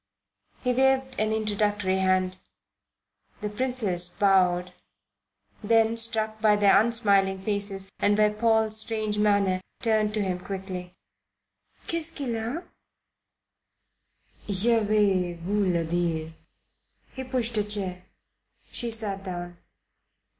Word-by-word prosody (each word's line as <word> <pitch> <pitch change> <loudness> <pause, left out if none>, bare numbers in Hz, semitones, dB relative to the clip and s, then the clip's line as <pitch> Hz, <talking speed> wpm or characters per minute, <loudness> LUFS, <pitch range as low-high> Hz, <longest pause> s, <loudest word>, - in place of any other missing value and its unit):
He 250 -1 +1
waved 265 0 +1
an 215 0 +1
introductory 205 -3 0
hand. 185 0 +1 1.0
The 210 - -2
Princess: 210 -6 0
bowed; 180 -1 +2 0.9
then, 225 +1 +3
struck 220 -1 +1
by 215 -1 +5
their 205 -1 +5
unsmiling 200 -5 +2
faces 200 -1 -1
and 205 0 +2
by 210 0 +4
Paul's 220 0 +1
strange 215 -1 -3
manner, 200 -3 +2 0.2
turned 215 -2 +1
to 210 - 0
him 185 -2 -2
quickly. 185 -1 -7 0.9
"'Qu'est 335 0 0
ce 320 - -2
qu'il 275 -5 -3
y - - -2
a?" 240 +10 -4 1.9
"Je 225 +4 +3
vais 205 -4 +1
vous 190 +3 -1
le 170 -1 0
dire." 165 -1 -2 0.8
He 260 - -6
pushed 250 -3 -2
a - - +1
chair. 195 -3 -2 0.7
She 240 - -2
sat 210 -4 -2
down. 175 -2 -6
210 Hz, 120 wpm, -26 LUFS, 185-225 Hz, 1.9 s, by